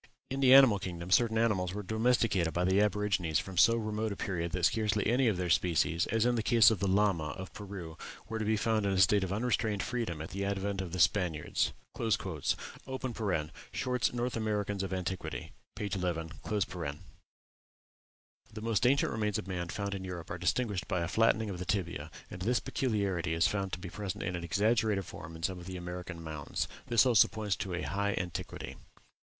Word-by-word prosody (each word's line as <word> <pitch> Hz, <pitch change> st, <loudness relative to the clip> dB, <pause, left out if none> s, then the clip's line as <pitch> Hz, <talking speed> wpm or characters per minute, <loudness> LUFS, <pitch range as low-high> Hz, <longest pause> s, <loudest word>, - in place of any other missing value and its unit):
In 135 Hz, -, -2 dB
the 130 Hz, -2 st, +5 dB
animal 130 Hz, -7 st, +7 dB
kingdom 90 Hz, -2 st, -6 dB
certain 115 Hz, +1 st, +4 dB
animals 100 Hz, -5 st, +1 dB
were 105 Hz, -, -4 dB
domesticated 110 Hz, -5 st, +1 dB
by 90 Hz, -, +1 dB
the 95 Hz, +2 st, +4 dB
aborigines 105 Hz, -6 st, +1 dB
from 95 Hz, -, -4 dB
so 115 Hz, +6 st, +6 dB
remote 110 Hz, -1 st, -2 dB
a -, -, -3 dB
period 85 Hz, -4 st, -3 dB
that 90 Hz, -1 st, +1 dB
scarcely 105 Hz, -1 st, +1 dB
any 125 Hz, +3 st, +3 dB
of 105 Hz, -5 st, +2 dB
their 90 Hz, -1 st, -1 dB
species, 85 Hz, 0 st, +2 dB
as 115 Hz, 0 st, +1 dB
in 125 Hz, -, +3 dB
the 115 Hz, -, +1 dB
case 115 Hz, 0 st, +6 dB
of 110 Hz, -, -1 dB
the 100 Hz, -, 0 dB
lama 95 Hz, -5 st, +2 dB
of 95 Hz, -1 st, -8 dB
Peru, 95 Hz, -6 st, -8 dB, 0.3 s
were 110 Hz, 0 st, -3 dB
to 110 Hz, -, -1 dB
be 110 Hz, +1 st, +2 dB
found 110 Hz, -1 st, +1 dB
in 100 Hz, -, +1 dB
a -, -, 0 dB
state 95 Hz, +2 st, +5 dB
of 95 Hz, -, -3 dB
unrestrained 110 Hz, -1 st, 0 dB
freedom 115 Hz, -10 st, -3 dB
at 80 Hz, -, -6 dB
the 100 Hz, +1 st, -3 dB
advent 100 Hz, 0 st, -1 dB
of 90 Hz, -3 st, -6 dB
the 90 Hz, -, -3 dB
Spaniards." 85 Hz, -4 st, +2 dB, 0.3 s
(Short's 95 Hz, -, 0 dB, 1.6 s
"North 120 Hz, +1 st, -2 dB
Americans 105 Hz, -3 st, -1 dB
of 95 Hz, -1 st, -3 dB
Antiquity," 95 Hz, 0 st, -4 dB, 0.2 s
p. 105 Hz, 0 st, -3 dB
11.) 85 Hz, -3 st, -2 dB
The 90 Hz, -7 st, -2 dB, 1.7 s
most 115 Hz, +1 st, +1 dB
ancient 140 Hz, +2 st, +3 dB
remains 105 Hz, -2 st, 0 dB
of -, -, -5 dB
man 90 Hz, -2 st, -3 dB
found 100 Hz, 0 st, -3 dB
in 95 Hz, -1 st, -5 dB
Europe 90 Hz, -3 st, -6 dB
are -, -, -4 dB
distinguished 105 Hz, -7 st, 0 dB
by 90 Hz, -, 0 dB
a 85 Hz, -, -1 dB
flattening 110 Hz, +1 st, +2 dB
of 90 Hz, -, -6 dB
the 90 Hz, -, -4 dB
tibia; 85 Hz, -6 st, -2 dB, 0.2 s
and 90 Hz, -, -8 dB
this 120 Hz, +5 st, +2 dB
peculiarity 100 Hz, -, -1 dB
is 80 Hz, +1 st, +3 dB
found 100 Hz, -2 st, 0 dB
to -, -, -2 dB
be 90 Hz, -1 st, -7 dB
present 100 Hz, -3 st, -4 dB
in 90 Hz, 0 st, -2 dB
an 85 Hz, -, -5 dB
exaggerated 105 Hz, +1 st, +1 dB
form 85 Hz, -, -9 dB
in 80 Hz, -, -10 dB
some 95 Hz, 0 st, -1 dB
of 90 Hz, -, -10 dB
the 95 Hz, -1 st, -5 dB
American 90 Hz, -1 st, -6 dB
mounds. 75 Hz, -3 st, -3 dB, 0.2 s
This 120 Hz, +1 st, +5 dB
also 120 Hz, -6 st, +6 dB
points 105 Hz, -3 st, -2 dB
to 95 Hz, -2 st, -3 dB
a 85 Hz, -, -3 dB
high 100 Hz, +7 st, -1 dB
antiquity. 90 Hz, -2 st, -5 dB
100 Hz, 195 wpm, -31 LUFS, 90-110 Hz, 1.7 s, animal